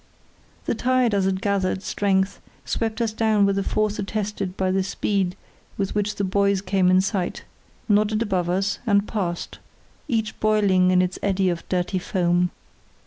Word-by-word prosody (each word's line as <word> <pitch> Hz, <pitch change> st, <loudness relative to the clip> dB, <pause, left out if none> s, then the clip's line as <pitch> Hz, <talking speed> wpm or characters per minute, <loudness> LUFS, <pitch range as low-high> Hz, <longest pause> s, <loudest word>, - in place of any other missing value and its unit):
The -, -, 0 dB
tide 250 Hz, 0 st, +1 dB
as 195 Hz, -1 st, +2 dB
it 190 Hz, 0 st, -1 dB
gathered 195 Hz, -1 st, 0 dB
strength 190 Hz, -1 st, 0 dB, 0.2 s
swept 225 Hz, 0 st, -2 dB
us 225 Hz, -2 st, 0 dB
down 220 Hz, -2 st, +3 dB
with 200 Hz, 0 st, +1 dB
a -, -, -1 dB
force 215 Hz, 0 st, -1 dB
attested 200 Hz, -2 st, -3 dB
by 185 Hz, -1 st, +1 dB
the 190 Hz, +1 st, +1 dB
speed 190 Hz, -1 st, -1 dB, 0.4 s
with 195 Hz, -1 st, -2 dB
which 210 Hz, 0 st, -1 dB
buoys 200 Hz, 0 st, +1 dB
came 190 Hz, -1 st, +1 dB
in 185 Hz, 0 st, +5 dB
sight, 190 Hz, -2 st, -2 dB, 0.4 s
nodded 215 Hz, +1 st, +2 dB
above 185 Hz, -5 st, -1 dB
us 195 Hz, +3 st, 0 dB
and 200 Hz, -1 st, +3 dB
passed, 175 Hz, -6 st, -3 dB, 0.5 s
each 220 Hz, -2 st, -2 dB
boiling 200 Hz, -4 st, +3 dB
in 185 Hz, 0 st, +4 dB
its 185 Hz, 0 st, -3 dB
eddy 195 Hz, -1 st, +1 dB
of 170 Hz, -1 st, -2 dB
dirty 185 Hz, +1 st, 0 dB
foam. 180 Hz, -1 st, +1 dB
195 Hz, 160 wpm, -23 LUFS, 185-210 Hz, 0.5 s, in